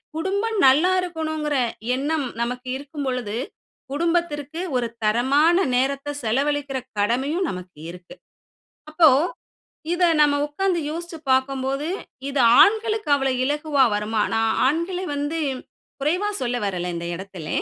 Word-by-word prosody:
குடும்பம் 400 +7 -1
நல்லா 305 +8 +5
இருக்கணும்ங்கிற 315 -4 -3 0.4
எண்ணம் 285 +1 -1
நமக்கு 250 +2 -3
இருக்கும் 285 +1 -7
பொழுது 240 -4 -2 0.5
குடும்பத்திற்கு 320 -1 -1 0.2
ஒரு 240 -1 0 0.2
தரமான 270 +10 +3 0.2
நேரத்த 275 +3 0
செலவழிக்கிற 280 +4 0 0.2
கடமையும் 270 - 0
நமக்கு 180 -3 -9
இருக்கு. 180 0 -13 0.8
அப்போ, 315 0 +6 0.8
இத 350 +1 +2 0.2
நம்ம 295 -1 +5
உட்கார்ந்து 345 +3 -1
யோசிச்சு 335 +1 -6
பார்க்கும்போது 270 +2 0 0.4
இது 280 -1 -1 0.2
ஆண்களுக்கு 440 -1 +1
அவ்வளவு 270 -2 0
இலகுவா 295 0 +2
வருமா? 210 +1 -1
நான் 225 0 +2
ஆண்கள 335 +6 0
வந்து 290 +3 -2 0.6
குறைவா 350 +9 0
சொல்ல 245 -1 -1
வரல 180 -3 -2
இந்த 170 0 -4
இடத்தில. 185 -3 -8
285 Hz, 115 wpm, -23 LUFS, 250-325 Hz, 0.8 s, அப்போ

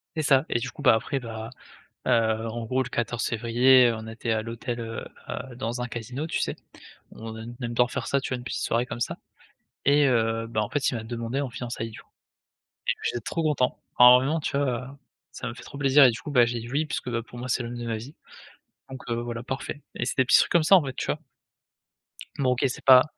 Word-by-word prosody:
C'est 155 - -1
ça 135 0 +4
et 120 - +1
du 125 +2 -4
coup - - -11
bah, 130 -5 +6
après 135 +5 -2
bah 115 -2 -7 0.6
heu, - - +2 0.4
en 115 +1 -4
gros, 130 +3 +1
le 130 - -7
14 120 0 -2
février 120 +2 +5
on 110 0 -8
était 115 +1 -5
à 110 -1 +1
l'hôtel, 120 +1 -5
heu, 115 -1 -5 0.2
à 125 -1 -6
dans 120 0 -3
un 125 - -3
casino 125 +7 -5
tu - - -2
sais, - - -1 0.6
on 110 0 -8
ai 110 - -7 0.2
aime 120 - -3
bien 125 +1 +3
faire 125 -1 -4
ça, 140 - +1
tu - - -5
vois? 130 - 0
Une 120 - -9
petite 125 - -3
soirée 115 +1 +1
comme 125 -3 -6
ça - - -1 0.7
et 145 0 +5
heu, 115 -2 +1
bah, 110 -2 -1
en 105 - -2
fait 145 -2 +1
il - - -3
m'a 115 - -4
demandé 115 +3 -3
en 140 - -3
fiançailles 120 -1 -5
du - - -10
coup, - - -29 0.8
et - - +4
j'étais 120 - -1
trop 165 +9 -3
content, 140 -5 +1 0.2
énormément 125 +6 +7
tu 145 -2 -2
vois? 145 - +2 0.2
Heu, 140 - -13 0.3
ça - - -6
m'a 120 - -4
fait - - -12
trop - - -10
plaisir 140 0 +6
et 130 - +8
du 115 - -6
coup 150 - -7
bah, 125 -3 +6
j'ai 120 0 -2
dit: 120 - -8
«Oui» 150 +4 +1
puisque 125 - -3
bah 115 - -1
pour 120 - -13
moi, 125 +1 -5
c'est 125 - 0
l'homme 120 +1 -6
de 120 - -5
ma 115 -1 -2
vie, 130 +7 -10 0.7
donc 130 -1 -8
heu, - - +1
voilà, 120 -1 -5
parfait, 135 +3 -5
et 125 - -2
c'est 120 - -3
des 130 - +4
petits - - +6
trucs - - +1
comme 170 -2 +4
ça 195 - +7
en 175 - +2
fait 130 -2 -5
tu - - -3
vois? - - -1 1.2
Bon, 130 -2 +2
OK, 125 +2 0
c'est 125 - -6
pas 130 -1 +9
125 Hz, 255 wpm, -26 LUFS, 115-135 Hz, 1.2 s, pas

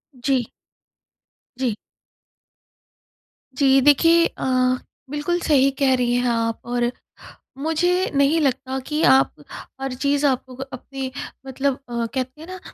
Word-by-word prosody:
जी। 255 -1 0 1.1
जी। 250 -4 -1 1.8
जी। 270 -1 +5
देखिए 330 +5 +5
अ, - - -5 0.7
बिल्कुल 295 +5 -1
सही 275 -4 +4
कह 270 -2 +4
रही 245 -1 0
हैं 245 0 +1
आप। 230 -1 -1
और 240 0 0 0.7
मुझे 350 +5 +1
नहीं 280 +4 +3
लगता 265 -1 -1
कि 305 +1 -1
आप 135 0 +5 0.5
हर 270 -1 -3
चीज़ 280 +3 0
आपको 260 -2 -1
अपनी 265 0 -7 0.3
मतलब 270 +1 -1
अ, 235 -1 -2
कहते 260 +4 -4
हैं 320 - -10
ना 370 0 -8
270 Hz, 120 wpm, -22 LUFS, 250-290 Hz, 1.8 s, जी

